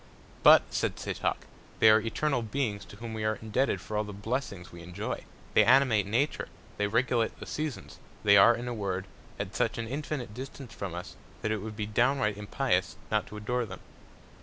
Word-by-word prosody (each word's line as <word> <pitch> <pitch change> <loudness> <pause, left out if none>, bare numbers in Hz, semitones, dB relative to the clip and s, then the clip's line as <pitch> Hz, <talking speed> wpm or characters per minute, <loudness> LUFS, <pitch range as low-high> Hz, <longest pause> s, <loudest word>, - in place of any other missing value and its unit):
But, - - +9
said - - 0
Setoc, - - -2 0.3
they - - +6
are 110 0 +6
eternal 125 +4 0
Beings 110 -3 -2
to - - -13
whom 115 +1 -7
we 110 -1 -3
are 110 0 +1
indebted 110 +5 0
for 105 - -6
all 105 - +1
the 105 - -7
Blessings 100 -3 -4
we 85 - -10
enjoy; 90 +5 -5 0.3
they 110 - +7
animate 120 -4 +5
Nature; 125 +8 0 0.3
they 105 - +1
regulate 115 +1 +1
the - - -7
Seasons; 155 -4 -5 0.2
they 100 -1 +7
are, 110 +4 +8
in 120 +1 -5
a 120 - -2
Word, 95 -4 -2 0.3
at - - -5
such - - 0
an 115 -1 -3
infinite 140 -3 -4
Distance 130 +1 -8
from 95 -4 -5
us, 90 - -7 0.3
that 110 - 0
it 110 - 0
would 110 +2 -6
be 105 -1 -2
downright 115 0 +2
impious 105 -1 0 0.2
not 105 -1 +1
to 105 - -9
adore 120 +4 -1
them. 90 -2 -9
110 Hz, 195 wpm, -29 LUFS, 105-125 Hz, 0.3 s, But